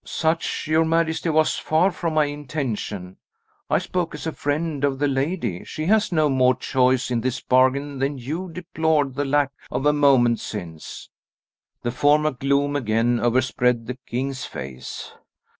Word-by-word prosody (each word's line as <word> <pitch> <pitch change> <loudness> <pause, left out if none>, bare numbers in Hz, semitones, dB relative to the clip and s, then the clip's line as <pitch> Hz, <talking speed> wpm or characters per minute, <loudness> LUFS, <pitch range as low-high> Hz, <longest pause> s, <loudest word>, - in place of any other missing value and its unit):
"Such, 160 +1 -1
your 160 +1 +3
majesty, 165 0 +1
was 155 0 +2
far 170 +5 +2
from 165 -3 -3
my 155 -1 +4
intention. 130 - -4 0.5
I - - +3
spoke 175 -4 -2
as 150 - -7
a 160 - -1
friend 150 0 -2
of 140 -2 +1
the 145 +1 +1
lady. 135 - -1
She 155 - -5
has 210 +2 +3
no 155 -3 +3
more 130 -2 +3
choice 130 0 +1
in 120 -2 +1
this 130 +1 -1
bargain 130 +2 +2
than 135 +1 -1
you 155 +9 -4
deplored 160 -5 0
the 145 +2 -2
lack 140 0 +2 0.2
of 135 - -2
a 150 - +5
moment 135 -5 +4
since." 85 -7 -8 0.7
The 120 - -1
former 150 +4 +3
gloom 140 +2 0
again 120 -1 +1
overspread 125 -1 +1
the 125 +2 -6
king's 130 +2 -3
face. 65 -1 -7
140 Hz, 160 wpm, -23 LUFS, 125-155 Hz, 0.7 s, a